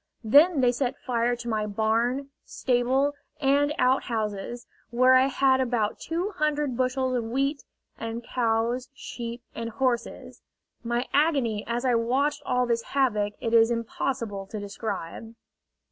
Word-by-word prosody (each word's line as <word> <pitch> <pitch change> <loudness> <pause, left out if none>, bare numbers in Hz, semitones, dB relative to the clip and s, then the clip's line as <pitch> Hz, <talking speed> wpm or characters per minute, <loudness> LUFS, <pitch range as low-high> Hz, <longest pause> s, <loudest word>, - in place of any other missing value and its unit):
Then 290 +7 +5
they 245 -1 +4
set 255 +2 -2
fire 240 -1 0
to 240 0 -9
my 215 -2 -1
barn, 230 +6 0
stable, 260 +3 +1 0.3
and 285 +1 +3
outhouses, 235 -3 -1 0.2
where 255 +2 +4
I 260 +1 +6
had 265 0 +3
about 235 -4 -1
two 350 +5 -2
hundred 295 -3 0
bushels 255 +1 0
of 240 - 0
wheat, 275 +5 -1 0.4
and 230 +1 -5
cows, 235 +1 0
sheep, 235 -2 -7
and 230 0 -4
horses. 245 0 -2 0.4
My 240 +1 -1
agony 275 -9 +2
as 240 +2 -2
I 250 - +3
watched 255 +6 +1
all 250 0 +2
this 235 -1 0
havoc 215 -7 0
it 230 -1 -2
is 225 0 +6
impossible 230 -3 -3
to 210 +2 -6
describe. 205 +1 -6
245 Hz, 140 wpm, -26 LUFS, 230-265 Hz, 0.4 s, I